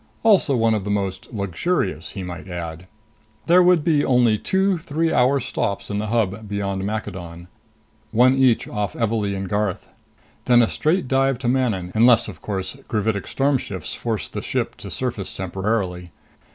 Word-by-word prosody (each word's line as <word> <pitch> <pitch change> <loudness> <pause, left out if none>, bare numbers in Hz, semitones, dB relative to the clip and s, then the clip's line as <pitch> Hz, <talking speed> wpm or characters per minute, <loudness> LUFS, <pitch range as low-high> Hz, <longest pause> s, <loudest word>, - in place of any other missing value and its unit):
Also 200 -11 +4
one 115 -1 +3
of 105 -3 -1
the 100 - -4
most 100 -2 -2
luxurious, 100 - -2
he 95 - -5
might 90 +1 -7
add. 85 -1 -6 0.6
There 175 +2 +6
would 180 -3 +4
be 150 -3 +3
only 125 -4 +4
two 190 -1 +1
three 160 -1 -1
hour 130 +3 +3
stops 105 -5 -3
in 100 - -1
the 105 - -2
Hub 110 -2 -1
beyond 100 -1 -2
Maccadon 90 -5 -5 0.6
one 125 +3 +5
each 130 -3 +3
off 105 -3 -3
Evalee 105 -3 0
and 95 0 -4
Garth. 105 0 -2 0.6
Then 120 -1 +6
a - - +2
straight 160 +4 0
dive 135 0 +2
to 125 0 -4
Manon 115 -8 0
unless, 120 +1 +5
of 95 -7 -9
course, 95 +1 -4
gravitic 105 -3 -1
storm 140 0 +1
shifts 95 -5 -6
forced 110 -6 -4
the - - -3
ship - - -2
to - - -9
surface - - -4
temporarily. 95 -3 -2
110 Hz, 165 wpm, -22 LUFS, 95-130 Hz, 0.6 s, There